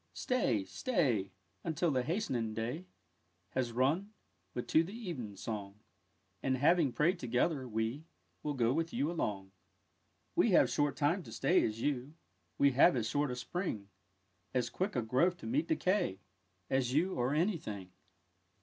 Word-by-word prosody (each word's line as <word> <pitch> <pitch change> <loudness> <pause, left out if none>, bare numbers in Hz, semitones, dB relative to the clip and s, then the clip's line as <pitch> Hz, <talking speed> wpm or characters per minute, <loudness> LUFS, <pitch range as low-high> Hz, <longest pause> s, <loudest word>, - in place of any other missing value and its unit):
Stay, 130 - +1
stay, 110 - 0 0.3
Until 165 +1 0
the 130 -2 +2
hasting 125 - -1
day 125 +11 -3 0.6
Has 125 -2 -1
run 150 - +1 0.4
But 125 - -4
to 160 - +5
the 185 +5 -8
even 155 - -5
song; 105 -1 -5 0.6
And, 130 -1 +1
having 150 +1 +4
pray'd 170 +8 +2
together, 130 +3 0
we 110 +6 -2 0.4
Will 150 -1 -2
go 120 -1 +2
with 165 +2 -1
you 150 +4 0
along. 100 - -3 0.8
We - - +4
have - - +5
short 145 -1 +1
time 160 +6 +2
to - - -11
stay, 185 - +3
as 110 +1 -2
you, 140 +1 -1 0.4
We 140 0 +5
have 140 +7 +6
as 115 -3 0
short 145 +3 +1
a 125 - -2
Spring; 120 - -4 0.7
As 125 -2 +1
quick 190 0 -2
a 125 - +1
growth 135 +11 +2
to - - -11
meet 280 +7 0
decay 185 - +1 0.5
As 130 -2 +1
you, 180 +5 +2
or 125 +4 0
any 175 +4 +2
thing. 100 - -7
135 Hz, 160 wpm, -33 LUFS, 115-170 Hz, 0.8 s, have